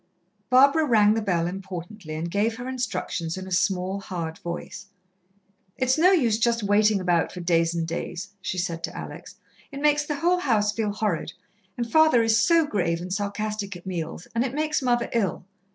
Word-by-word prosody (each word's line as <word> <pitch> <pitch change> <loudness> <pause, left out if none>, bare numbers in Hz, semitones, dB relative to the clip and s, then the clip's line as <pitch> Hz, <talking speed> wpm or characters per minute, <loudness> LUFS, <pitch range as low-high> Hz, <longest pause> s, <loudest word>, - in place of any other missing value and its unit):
Barbara 275 +5 +5
rang 215 -7 +4
the 225 - 0
bell 175 -5 0
importantly 180 -1 -6
and 165 +2 -4
gave 215 +4 +1
her 245 +2 -7
instructions 190 -9 -3
in 190 - -6
a 190 - -9
small, 185 +1 0
hard 170 -4 -5
voice. 170 +3 -7 0.9
"It's 260 0 +2
no 340 +4 +5
use 240 - +2
just 235 -1 +1
waiting 205 +1 +3
about 175 -3 +1
for 180 - -8
days 170 -1 +1
and 165 -1 -1
days," 175 +3 -5
she 185 - -3
said 170 -2 -3
to - - -10
Alex. - - -8 0.4
"It 275 - -6
makes 295 0 +3
the 295 0 -3
whole 350 +5 +2
house 215 -9 +2
feel 210 -1 -1
horrid, 200 -6 -2 0.4
and 240 -1 -2
father 315 -3 +5
is 225 0 +3
so 335 -2 +4
grave 175 - -1
and 180 +2 -5
sarcastic 205 0 -3
at 175 - -12
meals, 165 -2 -5
and 230 +1 +1
it 265 0 -3
makes 305 0 0
mother 240 -2 +1
ill. 200 -7 -1
205 Hz, 185 wpm, -25 LUFS, 180-245 Hz, 0.9 s, Barbara